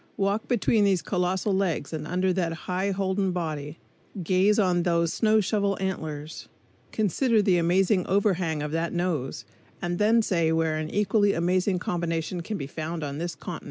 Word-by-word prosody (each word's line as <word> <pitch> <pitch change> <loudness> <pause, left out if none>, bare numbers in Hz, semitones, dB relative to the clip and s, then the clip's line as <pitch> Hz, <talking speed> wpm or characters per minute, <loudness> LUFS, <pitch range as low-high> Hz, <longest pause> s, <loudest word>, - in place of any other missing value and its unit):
Walk 200 +2 0
between 230 -3 +2
those 195 -3 +2
colossal 185 +2 0
legs 185 -6 -1
and 155 -1 -4
under 185 +2 +1
that 175 -3 -1
high 185 +2 -1
holden 190 0 0
body, 155 -3 -4 0.5
gaze 190 +4 +3
on 180 -4 +2
those 170 -1 +1
snow 220 -1 +3
shovel 200 -1 0
antlers, 160 -5 -4 0.4
consider 220 - +1
the 195 -3 +3
amazing 180 +2 +2
overhang 185 -6 +1
of 150 - -4
that 165 +1 -1
nose, 165 -10 -2 0.3
and 175 0 -3
then 225 +2 +4
say 170 -5 +1
where 160 -1 +1
an 155 0 -3
equally 205 +1 +2
amazing 180 +3 +1
combination 170 -1 -2
can 210 +5 -4
be 140 - -4
found 160 +3 -5
on 145 0 -4
this 170 0 -3
continent. - - -6
180 Hz, 165 wpm, -26 LUFS, 165-200 Hz, 0.5 s, then